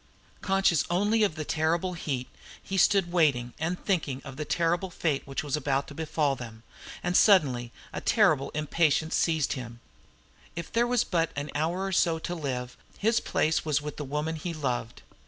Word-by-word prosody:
Conscious 195 Hz, -4 st, +3 dB
only 205 Hz, +6 st, +2 dB
of 200 Hz, -7 st, +2 dB
the 155 Hz, -1 st, -4 dB
terrible 165 Hz, +4 st, 0 dB
heat, 135 Hz, -7 st, -3 dB, 0.3 s
he 195 Hz, -, -6 dB
stood 190 Hz, -1 st, +3 dB
waiting 140 Hz, -9 st, +2 dB
and 170 Hz, +3 st, -1 dB
thinking 155 Hz, -9 st, 0 dB
of 135 Hz, -, -8 dB
the 170 Hz, +5 st, 0 dB
fate 150 Hz, -6 st, -1 dB
which 135 Hz, +1 st, -3 dB
was 145 Hz, -1 st, -1 dB
about 140 Hz, -1 st, 0 dB
to -, -, -9 dB
befall 150 Hz, -2 st, 0 dB
them; 115 Hz, -3 st, -9 dB, 0.4 s
and 180 Hz, 0 st, 0 dB
suddenly 135 Hz, -, +4 dB, 0.2 s
a -, -, -4 dB
terrible 140 Hz, -3 st, +3 dB
impatience 155 Hz, +1 st, +1 dB
seized 160 Hz, -4 st, +1 dB
upon 130 Hz, -, -4 dB
him. 115 Hz, 0 st, -11 dB, 0.8 s
If 170 Hz, -1 st, -6 dB
there 235 Hz, +1 st, +3 dB
was 245 Hz, -1 st, +2 dB
but 165 Hz, -6 st, 0 dB
an 145 Hz, +1 st, -4 dB
hour 170 Hz, +6 st, -1 dB
or 195 Hz, -, -2 dB
so 170 Hz, -2 st, +2 dB
to 170 Hz, +2 st, -4 dB
live, 130 Hz, -6 st, -4 dB, 0.2 s
his 225 Hz, +3 st, +2 dB
place 160 Hz, +1 st, 0 dB
was 150 Hz, -2 st, +1 dB
with 150 Hz, 0 st, -7 dB
the 150 Hz, -, -4 dB
woman 150 Hz, +3 st, -2 dB
he 170 Hz, +2 st, -4 dB
loved. 125 Hz, -6 st, -3 dB
155 Hz, 180 wpm, -28 LUFS, 140-175 Hz, 0.8 s, suddenly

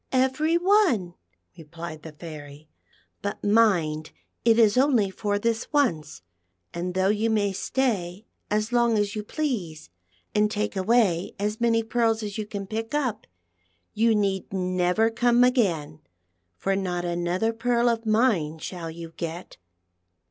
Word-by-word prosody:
" -, -, -47 dB, 0.2 s
Every 310 Hz, +5 st, 0 dB
one," 345 Hz, -, +2 dB, 0.4 s
replied 165 Hz, -1 st, -9 dB
the 160 Hz, -, -9 dB
Fairy, 150 Hz, -2 st, -10 dB, 0.3 s
" -, -, -36 dB
but 200 Hz, -, -4 dB
mind 180 Hz, -8 st, +2 dB, 0.3 s
it 230 Hz, -1 st, +4 dB
is 220 Hz, -3 st, +5 dB
only 250 Hz, -7 st, +3 dB
for 205 Hz, +1 st, -1 dB
this 230 Hz, +2 st, -2 dB
once; 160 Hz, -, 0 dB, 0.5 s
and 180 Hz, +1 st, -4 dB
though 190 Hz, +1 st, +2 dB
you 215 Hz, +2 st, +1 dB
may 205 Hz, -2 st, +1 dB
stay 200 Hz, -4 st, -2 dB, 0.2 s
as 215 Hz, +2 st, 0 dB
long 235 Hz, -2 st, +3 dB
as 205 Hz, 0 st, 0 dB
you 215 Hz, -, -2 dB
please, 205 Hz, -, -4 dB, 0.4 s
and 210 Hz, 0 st, +3 dB
take 210 Hz, 0 st, -2 dB
away 190 Hz, -3 st, +1 dB
as 210 Hz, +3 st, -3 dB
many 230 Hz, -1 st, +2 dB
pearls 225 Hz, -1 st, 0 dB
as 205 Hz, -1 st, -5 dB
you 210 Hz, -, -4 dB
can 200 Hz, -2 st, -5 dB
pick 225 Hz, +5 st, -4 dB
up, 250 Hz, -7 st, -2 dB, 0.7 s
you 225 Hz, +1 st, +3 dB
need 195 Hz, -2 st, -1 dB
never 185 Hz, +3 st, +1 dB
come 240 Hz, +1 st, +3 dB
again, 170 Hz, -, +1 dB, 0.6 s
for 195 Hz, -, 0 dB
not 180 Hz, -2 st, -2 dB
another 175 Hz, +5 st, -1 dB
pearl 240 Hz, +1 st, +1 dB
of 230 Hz, -1 st, +1 dB
mine 215 Hz, -9 st, +1 dB
shall 165 Hz, 0 st, -6 dB
you 165 Hz, 0 st, -9 dB
get." 170 Hz, +1 st, -6 dB
205 Hz, 150 wpm, -25 LUFS, 175-230 Hz, 0.7 s, is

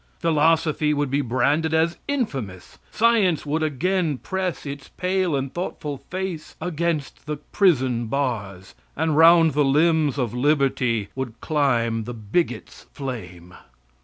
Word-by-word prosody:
Philosophy 155 Hz, -1 st, +2 dB
would 145 Hz, -2 st, -1 dB
be 140 Hz, +1 st, +2 dB
branded 145 Hz, +6 st, +1 dB
as 165 Hz, +1 st, +1 dB
infamous; 135 Hz, -, -4 dB
science 215 Hz, -9 st, +2 dB
would 155 Hz, +2 st, -1 dB
again 160 Hz, +1 st, 0 dB
press 185 Hz, +3 st, -3 dB
its 140 Hz, -1 st, -7 dB
pale 185 Hz, -3 st, 0 dB
and 135 Hz, -1 st, -3 dB
thoughtful 150 Hz, -5 st, -4 dB
face 185 Hz, -4 st, -5 dB
against 165 Hz, -4 st, -3 dB
the 150 Hz, 0 st, -3 dB
prison 130 Hz, -, +1 dB
bars; 110 Hz, -8 st, -3 dB, 0.2 s
and 160 Hz, -1 st, 0 dB
round 165 Hz, 0 st, +7 dB
the 145 Hz, +1 st, +2 dB
limbs 150 Hz, 0 st, +2 dB
of 120 Hz, -5 st, -1 dB
liberty 125 Hz, -5 st, +1 dB
would 125 Hz, -4 st, -5 dB
climb 120 Hz, -7 st, 0 dB
the 120 Hz, +1 st, -6 dB
bigot's 110 Hz, -, -3 dB
flame. 90 Hz, -, -7 dB
145 Hz, 130 wpm, -23 LUFS, 125-165 Hz, 0.2 s, round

